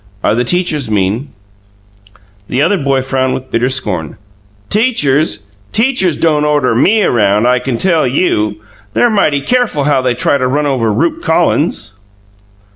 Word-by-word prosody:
"Are - - +2
the 120 +2 0
teachers 155 -3 -1
mean?" 105 +6 -1 1.2
The 125 - -1
other 190 +7 +2
boy 135 -2 0
frowned 130 0 -1
with 130 0 -8
bitter 120 +2 +1
scorn. 105 - -3 0.5
"Teachers! 150 - +1 0.3
Teachers 220 - +1
don't 150 -2 +1
order 145 -5 +1
ME 210 - +3
around, 105 - +2
I 125 0 +2
can 125 -2 -3
tell 165 -1 +1
you! 110 - 0 0.4
They're 240 - +3
mighty 155 -9 +1
careful 240 - 0
how 145 -2 +2
they 125 -1 0
try 140 +3 +1
to 130 - 0
run 145 +3 0
over 125 -6 0
Rupe 150 +11 -1
Collins." 160 -10 0
135 Hz, 150 wpm, -13 LUFS, 120-160 Hz, 1.2 s, ME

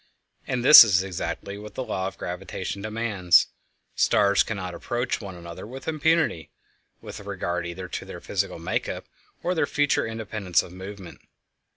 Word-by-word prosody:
And 125 -1 -2
this 150 - +12
is 95 -4 +2
exactly 100 +2 -5
what 105 0 -10
the 130 - -3
law 95 -6 -2
of - - -8
gravitation 95 +2 -5
demands; 110 -4 +2 0.4
stars 100 0 +3
cannot 95 -4 -3
approach 120 +6 -2
one 95 -3 -8
another 85 +3 -9
with 130 +3 -10
impunity, 160 - +1 0.5
with - - -9
regard 90 -3 -3
either 90 +2 -6
to - - -6
their - - -8
physical - - -2
make - - -2
up - - -5 0.4
or 180 - +1
their 165 - +1
future 145 -5 +1
independence 110 -5 -1
of 90 - -12
movement. 95 -1 -10
100 Hz, 160 wpm, -25 LUFS, 90-115 Hz, 0.5 s, this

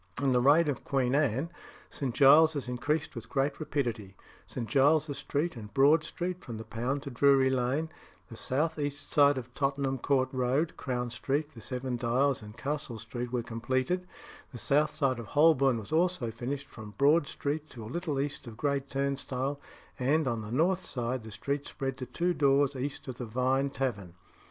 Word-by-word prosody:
In 140 -1 +2
the 125 -1 +3
reign 150 +5 +5
of 145 -4 -2
Queen 130 -2 0
Anne, 140 +2 +1 0.4
St. 130 -4 -3
Giles's 150 0 +6
increased 145 +6 -1
with 115 - -8
great 140 +1 0
rapidity 120 -10 -3 0.3
St. 120 -3 -5
Giles's 145 +4 +3
Street 155 +3 -1
and 105 -3 -9
Broad 145 +4 +5
Street 180 +3 -4
from 115 -3 -6
the 110 - -6
Pound 125 +6 -3
to 140 - -6
Drury 135 +1 +4
Lane, 130 +5 0 0.4
the 115 - -10
south 155 +7 -1
east 145 0 -4
side 145 -1 +5
of 125 -1 -7
Tottenham 135 -1 -1
Court 130 0 +1
Road, 130 +5 0
Crown 125 -2 -3
Street, 145 +5 -2
the 115 - -11
Seven 125 +1 -3
Dials, 125 +3 +1
and 105 +1 -11
Castle 140 -5 -3
Street 120 +2 -5
were 125 -2 -1
completed; 130 +10 -1 0.4
the 125 - -8
south 145 +5 +2
side 135 -5 0
of 115 - -7
Holborn 140 -4 +4
was 110 +3 -8
also 165 -7 +1
finished 135 +5 -4
from 110 -6 -11
Broad 145 +2 +4
Street 150 +1 -3
to 115 - -9
a - - -7
little 170 -5 -2
east 140 -2 -3
of 110 -2 -9
Great 140 0 -1
Turnstile, 140 0 -2 0.4
and, 145 +4 +2
on 115 -3 -1
the 105 0 -7
north 175 +8 +2
side, 125 0 -3
the 110 - -10
street 140 +6 -3
spread 135 -2 -3
to 130 - -5
two 175 +8 0
doors 140 -2 +3
east 140 +2 -4
of 130 -2 -6
the 125 - -3
Vine 130 +4 +1
Tavern. 110 -11 -3
135 Hz, 185 wpm, -30 LUFS, 125-145 Hz, 0.4 s, Giles's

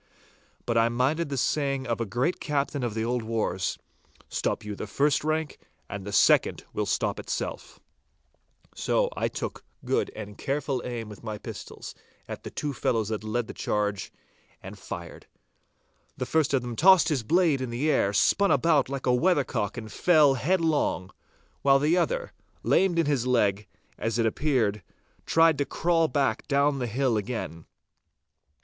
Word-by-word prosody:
But 115 -1 +2
I 115 +1 +3
minded 135 +7 0
the 140 - -3
saying 135 0 0
of 115 -1 -2
a 115 - -2
great 125 - -1
captain 145 -1 -1
of 120 -3 -2
the 110 0 -1
old 120 +1 0
wars, 110 -5 -2 0.5
'Stop - - -2
you 105 -1 -5
the - - -6
front 145 +1 +1
rank, 155 -1 -2 0.3
and 100 -1 -6
the 105 - -5
second 100 - +3
will - - -2
stop - - 0
of - - -8
itself.' - - -5 0.9
So - - 0
I - - 0
took - - -5 0.2
good - - 0
and 105 -1 -8
careful 140 -2 -1
aim 120 -3 -5
with 105 -1 -11
my 110 -2 -4
pistols - - -9 0.3
at - - -6
the - - -7
two 145 -1 -3
fellows 115 -4 0
that 110 -1 -3
led 115 +2 -1
the - - -8
charge, 105 -2 -2 0.5
and - - -9
fired. - - -8 0.9
The 125 - -2
first 150 +1 +1
of 130 - 0
them 120 -1 -5
tossed 185 +4 +6
his 145 -5 0
blade 160 +2 +2
in 130 - -3
the 130 +7 0
air, 100 - +2
spun 200 - +3
about 145 -1 +3
like 140 -1 -4
a 125 - +3
weathercock 125 - +1
and 110 -2 -7
fell 155 -6 +4
headlong, 150 - 0 0.5
while 135 -1 +5
the 150 +5 +2
other, - - -1 0.3
lamed 190 -3 +3
in 165 - +3
his 140 -4 0
leg, 105 -5 +1 0.3
as 115 0 -1
it 115 - +2
appeared, 110 -4 +1 0.5
tried 165 -3 +4
to - - +3
crawl 165 +1 +1
back 135 -7 0
down 140 0 +2
the 125 - -2
hill 125 0 +1
again. 100 -7 -5
130 Hz, 170 wpm, -27 LUFS, 110-150 Hz, 0.9 s, tossed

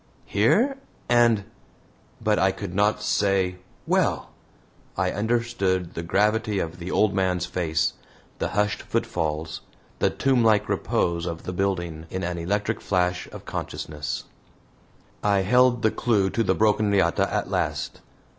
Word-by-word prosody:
"Here! 225 - +2 0.3
and" 120 -4 +4 0.8
but 105 -1 +1
I 95 +1 +4
could 95 -1 -6
not 105 +2 +2
say 95 -3 +1 0.3
"well!" - - +1 0.7
I - - +1
understood 105 -5 0
the 85 - -4
gravity 105 +4 +1
of 85 -1 -3
the 85 +2 -6
old 105 +1 +2
man's 90 -2 +1
face, 85 -3 0 0.5
the - - 0
hushed 105 0 +1
footfalls, 80 -1 -2 0.4
the - - +3
tomblike 115 -6 +3
repose 85 0 0
of 85 -1 -5
the 90 - -5
building, 85 -4 -2
in 95 0 -4
an 85 0 -2
electric 105 +5 -1
flash 90 -1 0
of - - -10
consciousness; 75 -1 -4 1.0
I 100 -1 +3
held 125 +4 +3
the 110 - +4
clue 100 -5 +1
to 115 - 0
the - - +2
broken 105 -1 +2
riata 95 -4 +2
at - - -2
last. - - -2
100 Hz, 135 wpm, -25 LUFS, 90-110 Hz, 1.0 s, and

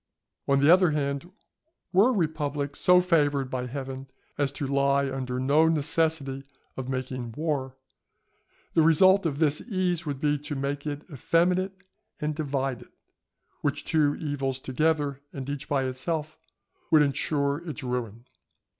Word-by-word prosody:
On 140 0 +3
the 145 +5 +7
other 185 -1 +5
hand, 140 +1 -2 0.6
were 200 +7 +6
a - - +2
republic 150 - -1
so 180 0 +5
favoured 145 -6 +1
by 125 -1 -2
Heaven 135 0 -6 0.3
as 140 -2 0
to 145 - -4
lie 140 0 +2
under 130 -1 -3
no 145 +5 +4
necessity 155 -3 0 0.3
of 130 -1 -5
making 130 -2 -4
war, 135 -3 -2 1.0
the 165 - +4
result 185 +4 +5
of 140 -3 -3
this 150 -1 +2
ease 185 -6 -1
would 140 -2 -3
be 145 0 +1
to 145 +1 -5
make 140 +2 -3
it 145 0 -4
effeminate 180 +7 +1 0.4
and 150 0 -1
divided 135 -5 -3 0.7
which 145 0 -1
two 150 -2 +2
evils 135 -3 -3
together, 145 +1 0
and 135 -1 -6
each 140 -1 -5
by 140 -2 +1
itself, 150 +4 -3 0.5
would 155 -2 +6
insure 140 0 0
its 150 -1 -6
ruin. 120 -2 -4
145 Hz, 145 wpm, -27 LUFS, 135-160 Hz, 1.0 s, the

